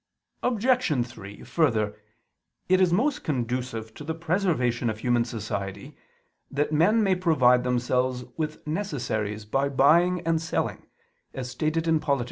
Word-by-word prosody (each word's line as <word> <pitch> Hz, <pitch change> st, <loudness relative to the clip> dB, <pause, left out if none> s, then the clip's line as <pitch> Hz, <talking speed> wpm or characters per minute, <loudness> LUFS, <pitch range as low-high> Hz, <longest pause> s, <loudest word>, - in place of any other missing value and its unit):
Obj. 240 Hz, -, +1 dB
3: 100 Hz, -4 st, -11 dB
Further, 110 Hz, -10 st, +1 dB, 0.7 s
it 185 Hz, +1 st, +4 dB
is 180 Hz, -2 st, +4 dB
most 255 Hz, +11 st, +1 dB
conducive 125 Hz, -4 st, -3 dB
to 150 Hz, -, -10 dB
the 160 Hz, +2 st, -3 dB
preservation 160 Hz, -, 0 dB
of 110 Hz, -, -3 dB
human 120 Hz, +1 st, +1 dB
society 100 Hz, -4 st, -5 dB, 0.5 s
that 145 Hz, +2 st, -1 dB
men 210 Hz, +9 st, +4 dB
may 195 Hz, -2 st, +3 dB
provide 135 Hz, -9 st, +3 dB
themselves 125 Hz, 0 st, 0 dB
with 155 Hz, -1 st, -4 dB
necessaries 120 Hz, -, -3 dB
by 135 Hz, +6 st, 0 dB
buying 165 Hz, +6 st, +4 dB
and 165 Hz, -1 st, 0 dB
selling, 165 Hz, -, -3 dB, 0.5 s
as 125 Hz, -2 st, -5 dB
stated 155 Hz, +5 st, -1 dB
in 160 Hz, -1 st, +3 dB
_Polit. 140 Hz, -2 st, 0 dB
140 Hz, 135 wpm, -26 LUFS, 120-165 Hz, 0.7 s, it